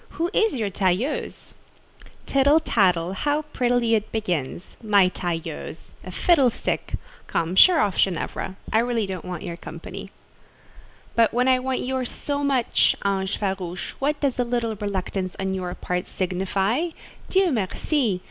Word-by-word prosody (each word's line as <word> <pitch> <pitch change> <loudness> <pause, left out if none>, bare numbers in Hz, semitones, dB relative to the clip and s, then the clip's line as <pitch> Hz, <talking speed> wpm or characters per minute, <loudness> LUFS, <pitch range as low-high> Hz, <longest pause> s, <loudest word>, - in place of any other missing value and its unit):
Who 340 +2 0
is 440 -1 +3
your 215 -5 -1
tailleuse?" 195 +9 -1 0.7
"Tittle 280 +3 +4
tattle: 185 - +2
how 290 +9 0
prettily 245 -2 +2
it 220 -1 0
begins! 180 -7 -3
My 205 -4 +4
tailleuse!—a 165 0 -5
fiddlestick! 270 - +1 0.3
Come, 170 +2 -1
sheer 355 - +8
off, 205 -11 +1
Ginevra. 190 +1 -1 0.2
I 220 - +5
really 235 -2 +1
don't 190 -3 -5
want 180 -2 -5
your 170 - -5
company." - - -8 1.0
"But 230 0 +3
when 250 +1 +3
I 255 -1 +5
want 260 0 -1
yours 260 -1 -2
so 285 0 -3
much, 270 -4 +3
ange 195 -1 0
farouche, 190 -3 -3
what 290 +2 0
does 275 -4 0
a - - +4
little 235 -2 -1
reluctance 190 -2 -3
on 190 0 -1
your 180 -2 -3
part 180 0 -3
signify? 195 - 0 0.4
Dieu 380 -2 +3
merci! 220 - 0
210 Hz, 140 wpm, -24 LUFS, 185-260 Hz, 1.0 s, sheer